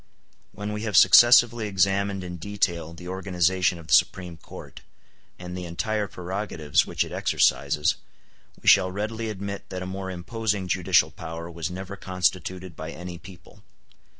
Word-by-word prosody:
When 105 +1 -5
we 105 - -4
have 105 -4 0
successively 120 +3 +7
examined 100 0 0
in 90 -1 -6
detail 85 -3 -2
the 90 +1 -10
organization 95 -1 0
of 85 - -12
the - - -2
Supreme 90 -2 +2
Court, - - -12 0.6
and 90 0 -8
the 90 -1 -5
entire 100 +5 -2
prerogatives 90 -5 -1
which - - 0
it - - -11
exercises, 70 +2 +1 0.6
we - - -12
shall 95 - +6
readily 110 +3 -4
admit 100 -1 -6
that 90 -1 -5
a - - -6
more 95 +1 -5
imposing 100 +2 -3
judicial 90 -4 +2
power 85 +2 -8
was 85 0 -4
never 95 +2 -7
constituted 90 -1 -2
by 80 0 -7
any 90 0 -8
people. 90 -3 -15
95 Hz, 150 wpm, -25 LUFS, 85-100 Hz, 0.6 s, successively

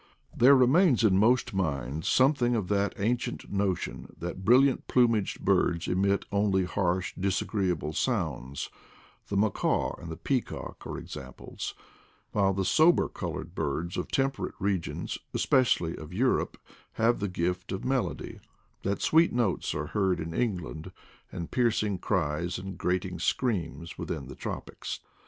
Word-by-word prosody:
There 135 +4 +7
remains 130 - +5
in 95 -3 +5
most 120 +2 +3
minds 75 -5 -2
something 130 -2 +3
of 105 -6 -2
that 100 0 +1
ancient 120 0 -2
notion 100 -3 -2
that 90 +2 -5
brilliant 130 +5 +4
plumaged 115 -5 +2
birds 90 -3 +2
emit 100 +2 +1
only 100 -2 +2
harsh 90 -1 -1
disagree 95 +1 0
able 80 -3 -2
sounds 75 - -2 0.3
— - - -28
the 100 - -1
macaw 105 -1 +1
and 85 - -7
the 80 - -6
peacock 130 +4 -3
are - - -5
ex - - -8
amples; - - -7 0.6
while 100 -2 +3
the 95 0 -1
sober 160 - +5
colored - - -5
birds 80 +5 -2
of 90 - -2
temper 135 0 0
ate - - -12
regions, 95 -4 -2 0.2
especially 90 -10 +2
of 80 +3 -9
Europe, 125 +5 +1 0.4
have 115 +2 +2
the 100 - -1
gift 90 +1 -2
of 95 - -4
melody; 130 -1 -2 0.4
that 100 +1 -2
sweet 165 +2 +5
notes 120 -7 0
are 75 0 -2
heard 95 -4 +2
in 80 0 -4
England, 90 -8 -2 0.4
and 85 - -6
piercing 110 -5 +1
cries 85 -2 -1
and 95 +1 -6
grating 90 0 -1
screams 85 - -1
within 75 -5 -4
the 65 +1 -9
tropics. - - -5
95 Hz, 145 wpm, -28 LUFS, 85-120 Hz, 0.6 s, There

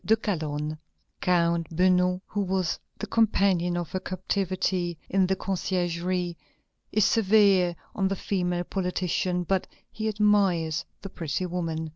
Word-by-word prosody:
de 220 - +4
Calonne." 155 -7 -3 0.4
Count 170 -2 +2
Beugnot, 180 +1 +2
who 205 - -2
was 190 -3 -1 0.2
the - - -4
companion 195 -6 +2
of 175 -2 -4
her 185 - -1
captivity 185 -2 -1
in 190 -1 +3
the 190 - +1
Conciergerie, 180 -2 -1 0.6
is 215 -1 +3
severe 195 -5 +4 0.2
on 195 -2 +1
the 195 - -1
female 180 -2 -1
politician, 180 -1 -1
but 190 +1 0 0.2
he 220 0 -3
admires 200 -7 +2 0.2
the 195 - -5
pretty 165 +2 -3
woman. 165 -3 -3
180 Hz, 130 wpm, -27 LUFS, 175-195 Hz, 0.6 s, de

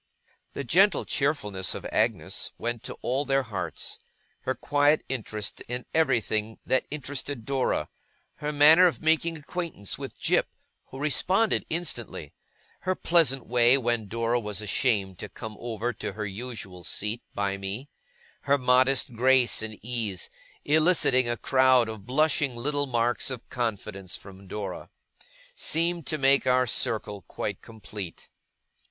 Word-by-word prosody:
The 140 - -4
gentle 190 - +4
cheerfulness 105 -10 0
of - - -7
Agnes - - 0
went 120 -1 -3
to - - -5
all 130 +3 0
their 135 -1 +1
hearts. 95 - -4 0.4
Her 130 - -2
quiet 145 +1 +2
interest 110 -5 -3
in 125 0 -4
everything 115 -7 +1
that 130 - +1
interested 140 -4 -4
Dora; 130 - 0 0.5
her 150 0 -3
manner 155 +5 +7
of 170 - -3
making 160 +1 +2
acquaintance 155 - -5
with - - -7
Jip - - +2 0.4
(who 130 - -11
responded 185 +9 +2
instantly); 120 - -3 0.5
her 185 0 -1
pleasant 155 -8 +3
way, 120 +2 +5
when 120 -4 0
Dora 115 +3 0
was 105 -3 -4
ashamed 105 -3 0
to - - -6
come 110 -2 -8
over 120 +1 -3
to 100 - -5
her 105 +1 -4
usual 100 -4 -7
seat 105 +6 -2
by 100 -1 -1
me; 100 +8 -4 0.6
her 140 0 +4
modest 130 +1 +3
grace 125 +1 +4
and 110 -1 -5
ease, 110 -6 -2 0.3
eliciting 150 -5 +3
a 120 - -1
crowd 130 -2 +4
of 110 -3 -8
blushing 145 -1 +2
little 145 +4 -1
marks 120 -2 +1
of 125 -3 -6
confidence 105 -6 -3
from 95 0 -12
Dora; 100 -2 -5 0.6
seemed 170 -1 -1
to 155 - 0
make 135 -1 +4
our 130 0 +4
circle 105 -3 0
quite - - -4
complete. 105 -5 -9
125 Hz, 140 wpm, -27 LUFS, 110-145 Hz, 0.6 s, manner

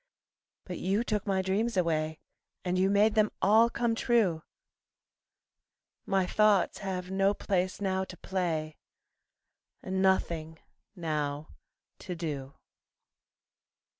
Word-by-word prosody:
But 180 -2 -6
you 200 +5 +1
took 210 -3 -2
my 190 -1 +1
dreams 200 +4 0
away 160 -3 0 0.5
And 180 0 0
you 190 +1 +3
made 205 +2 +4
them 215 -1 +3
all 220 +4 +5
come 235 0 0
true 220 -8 +2 1.7
My 195 -1 +2
thoughts 205 -1 +3
have 185 -2 -4
no 195 +1 +2
place 185 -2 -1
now 190 -1 0
to 180 - -11
play, 160 -5 -2 1.1
And 190 0 -2
nothing 165 -4 +1 0.4
now 150 -3 -3 0.5
to 180 - -6
do. 145 -5 -5
190 Hz, 110 wpm, -29 LUFS, 165-205 Hz, 1.7 s, all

